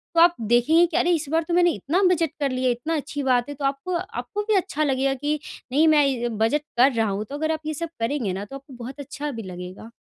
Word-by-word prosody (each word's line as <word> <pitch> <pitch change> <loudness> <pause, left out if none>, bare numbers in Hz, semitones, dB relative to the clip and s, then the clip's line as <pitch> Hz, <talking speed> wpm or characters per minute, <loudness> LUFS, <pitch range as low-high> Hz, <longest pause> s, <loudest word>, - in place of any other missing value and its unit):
तो 330 - +5
आप 345 0 +6
देखेंगे 240 +10 +4
कि 340 - -2
अरे! 350 - +2
इस 325 -3 0
बार 325 0 +2
तो 345 - -2
मैंने 350 0 +4
इतना 330 +5 -1
बचत 330 -2 0
कर 280 -2 0
लिया 255 0 0
इतनी 275 +8 -2
अच्छी 290 -1 -4
बात 250 0 +2
है, 290 - -5
तो 280 0 -4
आपको 275 +6 -1
आपको 380 +3 -4
भी 430 - +4
अच्छा 360 -5 0
लगेगा 270 -1 +1
कि 290 +3 -2 0.3
नहीं 310 +4 +4
मैं 265 -7 +2
बचत 225 +7 +2 0.2
कर 260 +3 +6
रहा 225 -2 +1
हूँ 200 +2 -2
तो 285 - -5
अगर 315 +2 -1
आप 315 - -1
ये 310 - -2
सब 335 +3 -4
करेंगे 230 -5 -1
ना, 200 +2 -4
तो 275 - -10
आपको 275 0 -11
बहुत 265 +4 -8
अच्छा 285 +1 -5
भी 225 -3 -6
लगेगा। 180 +3 -8
280 Hz, 255 wpm, -24 LUFS, 245-320 Hz, 0.3 s, आप